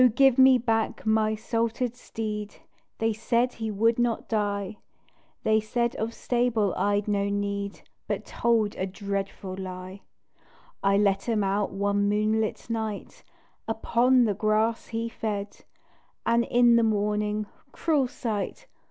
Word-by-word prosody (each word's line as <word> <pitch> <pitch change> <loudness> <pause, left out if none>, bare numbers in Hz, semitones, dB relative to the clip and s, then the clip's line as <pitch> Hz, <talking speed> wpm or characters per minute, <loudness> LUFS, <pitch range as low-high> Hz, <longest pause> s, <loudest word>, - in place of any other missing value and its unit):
give 270 -1 +5
me 260 0 +8
back 225 -2 -1
my 220 0 +2
"salted" 230 +2 -1
steed, 210 -3 -5 0.4
They 225 0 +1
said, 235 +3 +1
he 225 -1 -4
would 225 +3 +2
not 240 -2 0
die, 205 -2 -1 0.7
They 220 0 +3
said 235 +2 -1
of 225 +1 -2
stable 240 -5 +1
I'd 205 0 0
no 200 -1 +1
need, 200 0 -3 0.3
But - - -2
told 225 -3 +1
a 190 - -1
dreadful 195 -1 -4
lie. 185 0 -7 0.8
I 195 0 +3
let 200 +1 +1
him 215 -3 +2
out 195 +1 0
one 200 +1 +1
moonlight 215 +1 0
night 220 -3 -4 0.4
Upon 240 +3 +3
the 215 -3 +2
grass 215 +2 +1
he 230 0 -3
fed 210 -3 -4 0.7
And 235 0 +3
in 240 -1 +5
the - - +4
morning, 210 0 0 0.3
cruel 300 -6 +1
sight! 220 -5 -4
215 Hz, 135 wpm, -26 LUFS, 205-230 Hz, 0.8 s, me